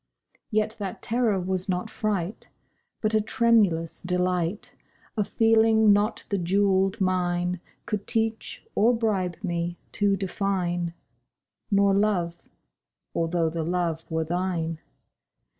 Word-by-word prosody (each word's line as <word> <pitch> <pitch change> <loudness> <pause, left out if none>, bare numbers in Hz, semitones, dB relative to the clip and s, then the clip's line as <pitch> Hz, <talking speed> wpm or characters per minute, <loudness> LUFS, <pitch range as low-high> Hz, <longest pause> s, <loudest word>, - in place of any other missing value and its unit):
Yet 215 0 0
that 195 -3 -5
terror 230 -4 +1
was 185 +1 -2
not 180 -1 -1
fright, 205 -2 -3 0.5
But 215 0 0
a 215 - +4
tremulous 210 -8 +2
delight— 180 +1 -1 0.4
A 215 - +2
feeling 220 0 +4
not 210 +2 0
the 200 - 0
jewelled 195 +2 +2
mine 180 -1 0 0.3
Could 210 -3 -3
teach 225 - -2
or 235 +3 +4
bribe 195 -6 0
me 175 -2 -2
to 200 -1 +2
define— 180 -3 -1 0.7
Nor 200 -1 +4
Love—although 170 -3 -2
the 165 0 -2
Love 170 -1 -1
were 160 0 0
thine. 165 -1 -2
190 Hz, 110 wpm, -26 LUFS, 175-215 Hz, 0.7 s, a